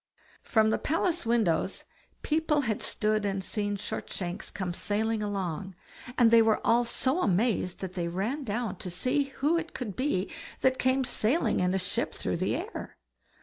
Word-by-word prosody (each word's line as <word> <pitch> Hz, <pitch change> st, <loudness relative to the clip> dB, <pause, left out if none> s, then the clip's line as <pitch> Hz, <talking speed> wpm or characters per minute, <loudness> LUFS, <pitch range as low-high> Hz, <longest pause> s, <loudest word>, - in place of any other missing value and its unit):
From 220 Hz, -1 st, +3 dB
the -, -, +1 dB
palace 335 Hz, -2 st, 0 dB
windows 200 Hz, -6 st, +1 dB, 0.4 s
people 310 Hz, -1 st, +2 dB
had 225 Hz, -6 st, -1 dB
stood 215 Hz, 0 st, 0 dB
and 195 Hz, -1 st, -1 dB
seen 205 Hz, 0 st, -2 dB
Shortshanks 185 Hz, -2 st, -4 dB
come 185 Hz, -3 st, -4 dB
sailing 215 Hz, +4 st, 0 dB
along, 190 Hz, -2 st, -3 dB, 0.4 s
and 235 Hz, -2 st, +6 dB
they 230 Hz, 0 st, +8 dB
were 220 Hz, -1 st, +3 dB
all 235 Hz, +1 st, +4 dB
so 260 Hz, +7 st, 0 dB
amazed 200 Hz, -, +1 dB
that 190 Hz, -1 st, -4 dB
they 175 Hz, -2 st, -2 dB
ran 210 Hz, -, -2 dB
down 220 Hz, -4 st, -2 dB
to 185 Hz, -, -6 dB
see 255 Hz, +11 st, +1 dB
who 290 Hz, +4 st, +1 dB
it 335 Hz, -, -8 dB
could 215 Hz, -7 st, -4 dB
be 255 Hz, -8 st, 0 dB, 0.3 s
that 260 Hz, 0 st, +3 dB
came 260 Hz, +1 st, +2 dB
sailing 245 Hz, +4 st, +2 dB
in 180 Hz, +1 st, +2 dB
a -, -, +3 dB
ship 185 Hz, -1 st, 0 dB
through -, -, -2 dB
the -, -, 0 dB
air. -, -, -6 dB
220 Hz, 170 wpm, -29 LUFS, 190-260 Hz, 0.4 s, they